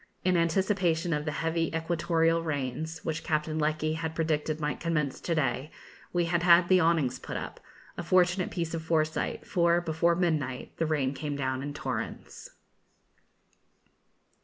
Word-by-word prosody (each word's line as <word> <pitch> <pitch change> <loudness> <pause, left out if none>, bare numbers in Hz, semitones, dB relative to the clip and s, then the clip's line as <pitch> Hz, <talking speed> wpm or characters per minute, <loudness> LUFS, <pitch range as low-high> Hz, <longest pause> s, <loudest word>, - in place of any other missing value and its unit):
In 185 -1 +3
anticipation 170 -1 +1
of 150 0 -2
the 150 - -1
heavy 165 0 +1
equatorial 165 0 +1
rains, 155 +1 -4
which 160 0 -2
Captain 155 0 -1
Lecky 155 0 0
had 160 0 -4
predicted 155 -1 -1
might 150 -1 -2
commence 150 -5 -1
to 170 - -1
day, 140 -1 0 0.4
we 175 -1 +1
had 170 0 +1
had 175 0 +6
the 185 -1 +6
awnings 160 -6 +2
put - - -5
up; - - -6 0.4
a - - 0
fortunate 180 +1 +2
piece 170 -3 -3
of 165 - -2
foresight, 160 -1 -1
for, 170 -2 +3
before 170 0 +1
midnight, 155 -7 -1
the 165 - 0
rain 140 -4 0
came 145 +1 -4
down 130 -2 -2
in 145 +1 -5
torrents. - - -5
160 Hz, 155 wpm, -29 LUFS, 150-170 Hz, 0.4 s, had